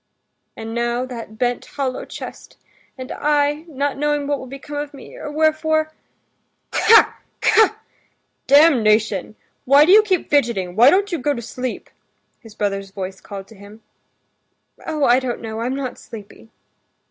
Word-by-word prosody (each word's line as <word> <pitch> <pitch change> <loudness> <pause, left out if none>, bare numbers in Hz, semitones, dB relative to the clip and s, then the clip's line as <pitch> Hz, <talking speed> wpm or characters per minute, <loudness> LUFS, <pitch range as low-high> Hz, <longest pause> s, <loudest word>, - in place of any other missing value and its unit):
"And 225 0 -6
now 240 +1 -1
that 230 -4 -9
bent, 245 0 -1
hollow 265 -3 -4
chest... - - -10 0.4
and 255 0 -8
I, 295 +1 0
not 280 -2 -3
knowing 295 -1 0
what 285 -1 -1
will 260 - -9
become 275 +3 -8
of 290 0 -5
me, 270 - -13
or - - -7
wherefore...." 315 0 +1 0.8
"K...ha! 450 0 +5 0.2
K...ha! 435 -1 +3 0.7
Damnation! 220 - +3 0.3
Why 280 +3 +6
do 355 - +3
you 425 +2 +9
keep 380 -5 -1
fidgeting, 225 -11 0
why 240 +5 +7
don't 395 +5 +2
you 340 - -2
go 285 +3 0
to 235 - -5
sleep?" 250 +2 -5 0.5
his 225 -4 -15
brother's 195 -1 -2
voice 190 -1 -7
called 195 -2 -9
to 225 - -15
him. 205 +2 -15 1.0
"Oh, 310 -2 -2
I 245 +2 +5
don't 255 -2 -4
know, 220 -1 -6
I'm 250 +3 -2
not 270 -3 -5
sleepy." 220 0 -12
260 Hz, 155 wpm, -20 LUFS, 225-295 Hz, 1.0 s, you